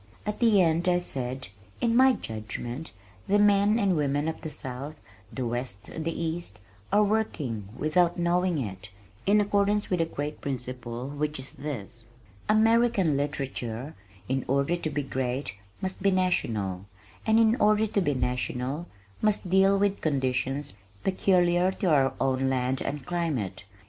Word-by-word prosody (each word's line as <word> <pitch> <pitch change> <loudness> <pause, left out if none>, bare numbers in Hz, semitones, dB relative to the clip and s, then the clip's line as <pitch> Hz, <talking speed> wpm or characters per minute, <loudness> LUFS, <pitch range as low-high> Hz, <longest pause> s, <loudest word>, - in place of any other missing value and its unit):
At 210 0 -3
the 225 -4 +5
end 165 +2 +1
I 175 - +4
said, 130 - -4 0.3
"In 230 -1 +2
my 260 +1 +6
judgment 120 - -5 0.4
the 205 - +4
men 205 +1 +4
and 195 -5 +2
women 145 0 0
of 160 - -3
the 155 - -5
south, 140 +2 -6 0.3
the 130 - -3
west 120 -4 -3
and 160 - -5
the 165 0 -3
east, 160 - -3 0.3
are 205 +1 +5
working 150 - -1
(without 175 +3 +2
knowing 175 0 +1
it) 100 -7 -5 0.4
in 210 +1 +5
accordance 205 0 +1
with 180 -2 +2
a - - +3
great 150 -1 -5
principle, 125 -2 -4
which 150 +1 -2
is 130 +1 -7
this: 120 -5 -6 0.4
American 220 -6 +4
literature, 135 -2 -3 0.3
in 130 +1 0
order 140 +5 +2
to 170 -2 -3
be 145 -1 -2
great, 130 -1 -2 0.3
must 190 0 -3
be 200 - +4
national, 110 - 0 0.4
and 220 0 +5
in 225 0 +5
order 215 -1 +4
to 205 -1 0
be 145 -6 +1
national, 125 +5 -2 0.3
must 210 -4 +1
deal 195 +1 +5
with 200 0 +1
conditions 135 -3 -1 0.3
peculiar 180 -1 +3
to 190 - -2
our 135 -3 +4
own 130 0 +1
land 130 0 0
and 140 -2 -4
climate. 140 - -2
150 Hz, 155 wpm, -27 LUFS, 130-190 Hz, 0.4 s, my